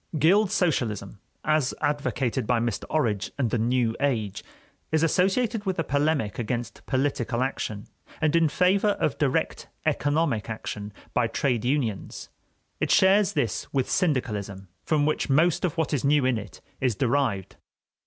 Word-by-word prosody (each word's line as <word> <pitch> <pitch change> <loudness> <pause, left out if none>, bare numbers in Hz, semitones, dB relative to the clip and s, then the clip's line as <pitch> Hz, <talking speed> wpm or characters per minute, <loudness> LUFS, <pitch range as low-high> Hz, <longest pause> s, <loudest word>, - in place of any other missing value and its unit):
Guild 190 +7 +4
socialism, 110 - -1 0.2
as 155 -3 +1
advocated 135 -5 -1
by 125 -2 +2
Mr. 115 -3 -2
Orage 110 -10 0
and 125 -6 0
the 120 - +1
"New 120 0 +1
Age," 115 -8 -1 0.5
is 160 0 +2
associated 200 +6 +1
with 190 - 0
a 165 - +1
polemic 145 -7 0
against 120 0 -4
"political" 130 -3 0
action, 110 -6 -3 0.3
and 155 0 +2
in 165 -2 +4
favor 195 +6 +2
of 150 - 0
direct 140 -4 0 0.2
economic 145 -7 0
action 105 -1 -5 0.2
by 120 -2 +2
trade 120 0 0
unions. 120 -6 -2 0.5
It - - 0
shares 195 +1 +4
this 135 - -2
with 135 -2 -1
syndicalism, 105 - -1
from 150 -2 +1
which 155 0 0
most 155 +6 +3
of 170 -3 -1
what 160 -1 0
is 140 - 0
new 145 -1 +3
in 125 -3 +2
it 105 -3 -11 0.2
is 125 -4 +1
derived. 120 -6 0
135 Hz, 150 wpm, -26 LUFS, 115-155 Hz, 0.5 s, Guild